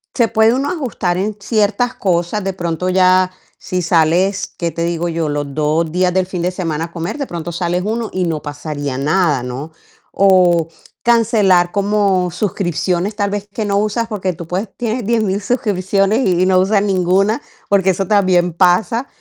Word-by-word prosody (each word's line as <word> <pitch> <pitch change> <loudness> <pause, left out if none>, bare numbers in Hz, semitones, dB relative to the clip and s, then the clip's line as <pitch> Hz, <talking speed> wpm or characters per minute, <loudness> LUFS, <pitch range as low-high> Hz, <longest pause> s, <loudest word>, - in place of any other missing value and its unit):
se 235 -3 +3
puede 220 +1 +4
uno 275 +3 -1
ajustar 225 - -2
en 205 +2 -2
ciertas 220 +3 0
cosas, 185 -2 0
de 195 - -1
pronto 175 -1 -3
ya 185 0 +3 0.3
si 180 0 -3
sales, 175 +3 +1
¿qué 170 -1 -2
te 165 - -3
digo 170 0 -2
yo?, 165 -1 -2
los 145 -1 -3
2 155 +2 0
días 180 +1 +1
del 185 0 +1
fin 185 -2 -4
de 180 +1 0
semana 165 -3 -3
a 170 - -13
comer, 175 - -4
de 280 - -4
pronto 170 0 -5
sales 175 +1 -1
1 225 +1 -2
y, 185 - -1
no 160 -3 -2
pasaría 145 -2 -5
nada, 150 -1 +1
¿no? 130 +6 -6 0.4
O 180 -4 +4 0.3
cancelar 210 -7 +3
como 200 -3 +1
suscripciones, 185 0 -1
tal 205 -1 0
vez 205 0 -4
que 220 - -2
no 200 -1 0
usas, 215 +3 0
porque 195 -4 -2
tú 165 0 -9
puedes 190 +5 -3
tienes 235 0 -2
10000 215 -3 0
suscripciones 200 0 0
y 180 -1 +2
y - - +3
no 185 -1 +4
usas 200 +2 +2
ninguna, 195 +4 +1 0.3
porque 195 -2 +3
eso 190 +1 -2
también 185 -4 +2
pasa, 195 +9 +2
185 Hz, 180 wpm, -17 LUFS, 170-210 Hz, 0.4 s, puede